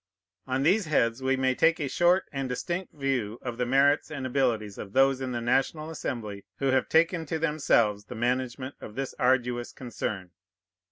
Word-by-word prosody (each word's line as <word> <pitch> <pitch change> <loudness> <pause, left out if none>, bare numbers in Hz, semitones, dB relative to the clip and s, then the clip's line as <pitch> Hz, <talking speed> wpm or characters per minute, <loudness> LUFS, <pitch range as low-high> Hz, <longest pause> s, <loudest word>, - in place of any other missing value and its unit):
On 130 +1 0
these 190 +6 +3
heads 120 -5 +1
we 135 0 +1
may 130 0 +2
take 165 +5 +3
a 145 - -1
short 175 +6 +3
and 135 -2 -3
distinct 175 +8 -3
view 130 -7 -2
of 120 -1 -5
the 125 - 0
merits 140 +4 +3
and 145 -4 -5
abilities 120 -6 0
of 100 - -8
those 135 0 +4
in 130 -1 -3
the 120 -1 -3
National 135 +6 0
Assembly 110 -10 -5
who 135 -1 +1
have 130 -1 +1
taken 165 +1 +3
to 160 - -1
themselves 120 -10 +1
the 125 - -8
management 125 +3 -2
of 105 - -9
this 135 -1 -3
arduous 125 -1 +1
concern. 110 -7 -5
130 Hz, 180 wpm, -27 LUFS, 120-145 Hz, -, those